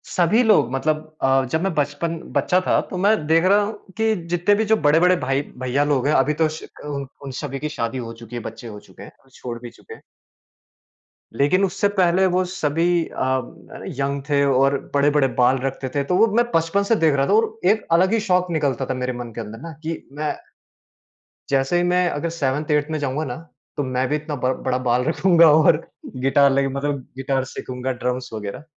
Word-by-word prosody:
सभी 180 +7 +3
लोग 215 - +3
मतलब 155 +3 -2
अ, 135 0 +3
जब 160 +1 0
मैं 195 -3 0
बचपन 150 +3 -2 0.2
बच्चा 180 - +2
था - - +3
तो 185 - -5
मैं 205 +4 +4
देख 165 +2 +4
रहा 200 +2 +4
हूँ 210 +2 -4 0.2
कि 220 0 +2
जितने 175 +4 +2
भी 220 +1 0
जो 220 +1 +3
बड़े-बड़े 165 +5 +4
भाई 135 -1 -1 0.2
भैया 130 +3 0
लोग 145 -2 +1
हैं। 150 - +2
अभी 145 +3 +3
तो 160 +1 +1
उस 155 +1 -4 0.2
उन 140 -2 -4 0.2
उन 135 - -6
सभी 135 -2 -5
की 150 - -3
शादी 115 -3 -3
हो 115 -2 -6
चुकी 115 +1 -11
है, 120 - -4
बच्चे 115 +2 -8
हो 105 -2 -8
चुके - - -15
हैं - - -12
और 135 - -26
छोड़ 120 -2 -7
भी 120 - -8
चुके 450 - -14
हैं। - - -14 1.4
लेकिन 185 +8 +3
उससे 195 +2 0
पहले 185 +1 +3
वो 185 - +3
सभी 165 -2 -1 0.2
अ, 130 0 -1 0.6
यंग 140 0 -1
थे 140 -1 +3
और 135 +1 +3 0.2
बड़े-बड़े 145 -1 +3
बाल 125 +2 +4
रखते 130 -1 -3
थे। 140 - +1
तो 180 +6 -1
वो 225 +2 +5
मैं 240 0 +4
बचपन 165 +5 +1
से 225 +3 +2
देख 160 -6 +3
रहा 135 0 +1
था - - +2
और 225 0 +1
एक 220 - -1
अलग 185 +5 +4
ही 225 - +3
शौक 180 0 +3
निकलता 140 -5 0
था 130 - -2
मेरे 125 0 -3
मन 120 -1 -7
के 115 - -4
अंदर 110 +1 -9
ना 165 - -7
कि 165 0 -3 0.2
मैं 155 - -1 1.1
जैसे 135 +5 +1
ही 175 - +2
मैं 180 0 +2
अगर 165 +3 -3
सेवेंथ, 150 -1 -2
एट्थ 150 +1 +1
में 155 - -2
जाऊँगा 145 +2 -2
ना, 125 -2 -4 0.4
तो 145 - 0
मैं 130 0 -1
भी 150 - +1
इतना 150 0 -4
बड़ 130 0 0
बड़ा 125 0 +1
बाल 125 +1 +2
रखूँगा 170 0 +5
और 155 0 +4 0.4
गिटार 140 0 +4
लेके 135 0 +2
मतलब 140 0 -2 0.2
गिटार 135 0 -1
सीखूँगा, 130 +1 -4
ड्रम्स 125 0 -3
वग़ैरह 105 +6 -6
145 Hz, 215 wpm, -21 LUFS, 130-175 Hz, 1.4 s, वो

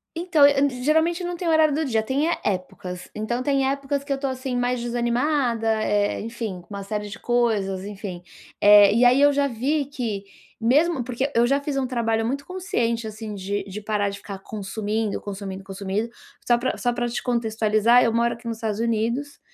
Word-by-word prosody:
Então 335 -4 +4
e 275 -3 +1
geralmente 325 +4 +2
não 350 0 -3
tem 350 - -3
horário 315 -2 +4
do 315 0 0
dia, 225 -4 +1
tem 275 +8 0
é - - -1
épocas, 180 -2 -4
então 240 +4 -2
tem 275 -1 +2
épocas 275 0 -2
que 280 - -7
eu - - +3
estou, 275 0 -2
assim, 260 -1 -4
mais 245 0 0
desanimada, 240 0 0 0.2
eh, 205 0 +1
enfim, 225 -5 -5
com 190 +4 -14
uma 200 0 -5
série 210 +1 -4
de 215 - -9
coisas, 215 -6 0
enfim, 195 -3 -7 0.4
eh, 205 -1 +8
e 245 +1 +5
aí 255 +3 +5
eu 290 0 +6
já 280 0 +1
vi 275 +5 -1
que 230 -8 -4 0.4
mesmo 275 +4 +2
porque 255 +3 -2
eu 235 +1 +5
já 275 +3 +2
fiz 285 -1 -3
um 265 - +1
trabalho 225 -3 0
muito 280 +4 -2
consciente, 235 - -2
assim, 215 -1 -6
de 200 +1 -3
de 200 +1 -6
parar 205 -1 -1
de 200 - -6
ficar 195 -1 -8
consumindo, 210 +1 -3
consumindo, 195 -1 -6
consumindo. 195 +3 -3 0.4
Só 240 -1 +5
pra 250 +2 -1
só 245 - +1
pra 240 0 -1
te 240 - -3
contextualizar, 225 0 +3
eu 230 - +2
moro 235 +1 +1
aqui 235 0 -10
nos 230 -1 -3
Estados 220 -1 -3
Unidos, 235 +5 -1
235 Hz, 200 wpm, -24 LUFS, 210-275 Hz, 0.4 s, eh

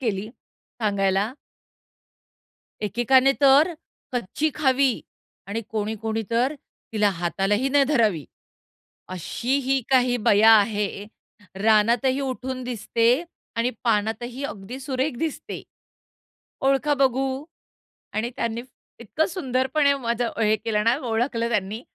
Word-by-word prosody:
केली 215 -4 -2 0.5
सांगायला. 200 +1 +1 1.5
एकेकाने 245 +6 +3
तर 280 +5 +6 0.4
कच्ची 245 +7 -1
खावी 265 -3 +2 0.5
आणि 215 +3 -2
कोणी-कोणी 220 +1 -2
तर 245 +5 +1 0.4
तिला 210 -2 +3
हातालाही 195 +7 0
नाही 280 0 +4
धरावी. 220 - +1 0.8
अशीही 260 - -1
काही 250 -2 +4
बया 220 0 +6
आहे, 205 -1 +2 0.6
रानातही 230 +5 +3
उठून 260 -1 -4
दिसते 230 -1 -1 0.5
आणि 230 +2 +1
पानातही 235 +4 -1
अगदी 235 -2 -6
सुरेख 265 0 -2
दिसते. 320 0 -4 1.0
ओळखा 275 +2 +2
बघू? 270 0 0 0.7
आणि 215 +3 -1
त्यांनी 230 -2 -2 0.4
इतकं 235 +8 -1
सुंदरपणे 280 -3 +1
माझं 235 -2 -1
हे 215 0 +3
केलं 210 0 -1
ना 230 +2 +3
ओळखलं 230 0 0
त्यांनी. 215 0 -2
235 Hz, 100 wpm, -24 LUFS, 215-265 Hz, 1.5 s, तर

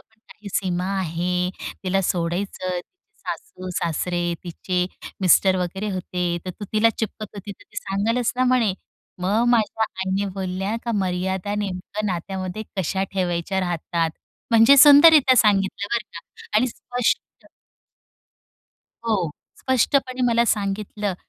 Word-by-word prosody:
पण 220 -1 -30
काही 210 -1 -11
सीमा 180 -2 0
आहे. 180 +1 -1 0.3
तिला 195 +1 +1
सोडायचं. 180 +1 -2 0.5
सासू-सासरे 175 -1 -3
तिचे 180 +1 -2 0.3
मिस्टर 185 +1 +5
वगैरे 190 +4 -3
होते. 180 -2 -2
तर 185 - -4
तू 205 - -8
तिला 220 +1 +4
चिपकत 215 -1 -4
होती. 200 +1 -7
तर - - -19
ती - - -22
सांगेलच 225 +5 0
ना." 255 - +2
म्हणे. 245 -6 +2 0.5
मग 205 +6 +2
माझ्या 225 -1 +2
आईने 190 0 -2
बोलल्या 190 +3 -2
का 235 - -1
मर्यादा 190 +1 -1
नेमकं 205 +1 -4
नात्यामध्ये 185 +2 -4
कशा 190 +1 -1
ठेवायच्या 185 0 -1
राहतात. 170 -2 -1 0.4
म्हणजे 230 +4 +7
सुंदररित्या 290 -1 +8
सांगितलं. 200 -2 +2
बरं 230 -2 -1
का, 170 - -7 0.4
आणि 250 +4 +4
स्पष्ट. 245 +1 -3 1.6
हो 195 -8 0 0.3
स्पष्टपणे 260 0 +1
मला 235 0 +3
सांगितलं 205 -1 -1
195 Hz, 120 wpm, -23 LUFS, 180-220 Hz, 1.6 s, सुंदररित्या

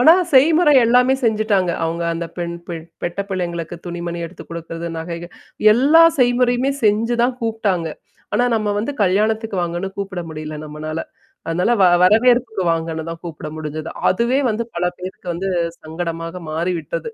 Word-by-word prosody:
ஆனா 310 +6 +8 0.2
செய்முறை 300 +3 +6
எல்லாமே 250 +3 +4
செஞ்சுட்டாங்க. 215 -5 +2
அவங்க 165 +1 -2
அந்த 170 0 -3
பெண் 170 -1 -3
பெ 175 - -3 0.3
பெட்ட 175 +3 -2
பிள்ளைங்களுக்கு 175 -2 -3
துணி 175 0 -5
மணி 170 0 -3
எடுத்து 170 - -11
குடுக்குறது, 170 0 -6
நகைகள் 170 +1 -6 0.4
எல்லா 285 +8 +6 0.2
செய்முறையுமே 245 +1 +3
செஞ்சு 220 +3 +2
தான் 245 +1 +1
கூப்பிடாங்க. 205 -7 0 0.5
ஆனா 245 - +3
நம்ம 215 -2 0
வந்து 230 +7 -2
கல்யாணத்துக்கு 215 +2 +1
வாங்கன்னு 175 +2 -2
கூப்பிட 195 -2 -4
முடியல 155 0 -6
நம்மனால. 155 +1 -5 0.5
அதனால 180 +6 +1
வ - - +7 0.2
வரவேற்புக்கு 230 +2 +4
வாங்கன்னு 160 -1 -3
தான் 165 0 -7
கூப்பிட 160 -2 -7
முடிஞ்சது. 155 +1 -5 0.2
அதுவே 235 +7 +1
வந்து 220 +2 -1
பல 175 +1 -1
பேருக்கு 185 0 -8
வந்து 190 +3 -3 0.3
சங்கடமாக 165 +2 -5
மாறிவிட்டது. 175 - -2
185 Hz, 145 wpm, -20 LUFS, 165-230 Hz, 0.5 s, ஆனா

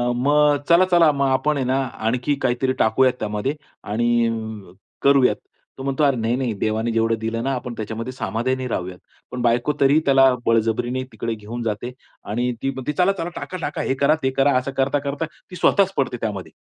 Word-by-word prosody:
मग 145 +3 +3
चला-चला 170 -2 +5
मग 140 -1 0
आपण 140 +3 +1
आहे 130 - -1
ना 130 +2 +1 0.3
आणखी 125 +5 0
काहीतरी 130 +1 +1
टाकूयात 130 +3 +3
त्यामध्ये 105 +7 -2 0.3
आणि 110 -3 -1 0.3
करूयात". 140 -2 +4 0.4
तो 135 - -7
म्हणतो 135 +2 0
"अरे 140 -2 +4
नाही, 115 +2 0
नाही 125 -4 -1
देवाने 110 +2 0
जेवढं 115 0 +1
दिलं 115 +1 -3
ना 135 +1 0
आपण 125 -1 -5
त्याच्यामध्ये 110 +3 -5
समाधानी 125 +2 -2
राहूयात." 90 -5 -4 0.3
पण 125 - -4
बायको 120 +4 +2
तरीही 140 +3 +5
त्याला 135 -1 +5
बळजबरीने 115 +3 +1
तिकडे 115 +1 -4
घेऊन 115 +3 -7
जाते. 110 +3 -3 0.3
आणि 120 +4 -1
ती 135 - 0
म्हणते 130 +2 -4
"चला-चला, 180 -1 +1
टाका-टाका 165 -5 -4
हे - - 0
करा, 140 +3 +3
ते 130 - +1
करा". 135 -1 +4
असं 130 +2 -2
करता-करता 140 +3 0 0.2
ती 180 - -9
स्वतःच 195 +2 +3
पडते 130 -3 0
त्यामध्ये. 105 -4 -4
130 Hz, 175 wpm, -22 LUFS, 115-140 Hz, 0.4 s, चला-चला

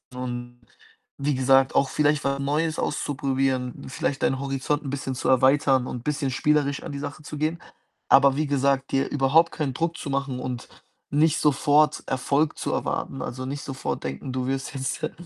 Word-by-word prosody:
und 120 -1 -6 0.6
wie 140 0 0
gesagt, 135 +1 +4
auch 135 -1 +3
vielleicht 150 0 +2
was 140 0 0
Neues 155 +3 0
auszuprobieren, 135 -3 -1
vielleicht 135 +1 -2
deinen 135 - +1
Horizont 140 +2 -1
'n 135 - -5
bisschen 135 -1 -3
zu - - -2
erweitern 130 0 +4
und 120 -1 -6
bisschen 145 -2 -1
spielerisch 145 +1 +1
an - - -6
die 140 - -5
Sache 145 +1 -6
zu 150 - -7
gehen. 155 +3 -1 0.5
Aber 135 -1 +6
wie 150 0 0
gesagt, 140 -1 +1
dir 135 0 +1
überhaupt 145 +4 +3
keinen 140 -4 -2
Druck 165 +4 -2
zu 145 - -6
machen 135 -2 -2
und 125 -1 -5 0.4
nicht 155 +2 +3
sofort 150 +1 +3
Erfolg 140 +3 0
zu - - -2
erwarten. 135 - -2
Also, 130 +1 -5
nicht 140 +2 -4
sofort 135 -1 -4
denken, 70 - -5
du 130 0 -2
wirst 135 +1 -3
jetzt 130 -1 -3
der - - -1
140 Hz, 180 wpm, -25 LUFS, 130-145 Hz, 0.6 s, Aber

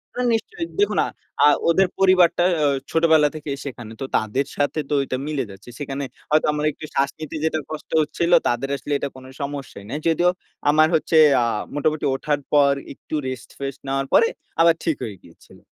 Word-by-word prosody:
হ্যাঁ, 250 0 0
নিশ্চয়ই। 335 - -2
দেখুন 410 - +2 0.5
আ - - +8 0.2
ওদের 190 +3 +4
পরিবারটা 185 -2 +5
অ্যা 150 - +2 0.2
ছোটবেলা 160 -2 +4
থেকেই 145 -2 -5
সেখানে। 120 -5 -7
তো - - -1
তাদের 120 +6 -1
সাথে 145 +2 0
তো - - -1
ওইটা 130 -1 -2
মিলে 150 -3 -1
যাচ্ছে। 95 +5 -13
সেখানে 140 -1 -4 0.3
হয়তো 155 +1 +3
আমার 150 0 -1
একটু 155 - -10
শ্বাস 135 0 +2
নিতে 155 0 -6
যেটা 160 0 0
কষ্ট 155 - -7
হচ্ছিল, 170 +3 -1 0.2
তাদের 120 +3 -1
আসলে 145 +2 -4
এটা 140 - -3
কোন 130 0 -12 0.2
সমস্যাই 140 -7 -6
নাই। 145 +5 -3
যদিও 175 +2 +3 0.4
আমার 155 +1 +5
হচ্ছে, 160 +1 +2 0.2
আ - - +3 0.3
মোটামুটি 155 +1 0
ওঠার 145 +2 -1
পর 140 -1 +5 0.2
একটু 145 - -7
রেস্ট-ফেস্ট 135 +2 -7
নেওয়ার 135 0 -1
পরে, 460 - +6 0.3
আবার 165 0 +6
ঠিক 160 -4 +1
হয়ে 105 -3 -6
গিয়েছিল। 85 - -18
145 Hz, 180 wpm, -22 LUFS, 135-160 Hz, 0.5 s, আ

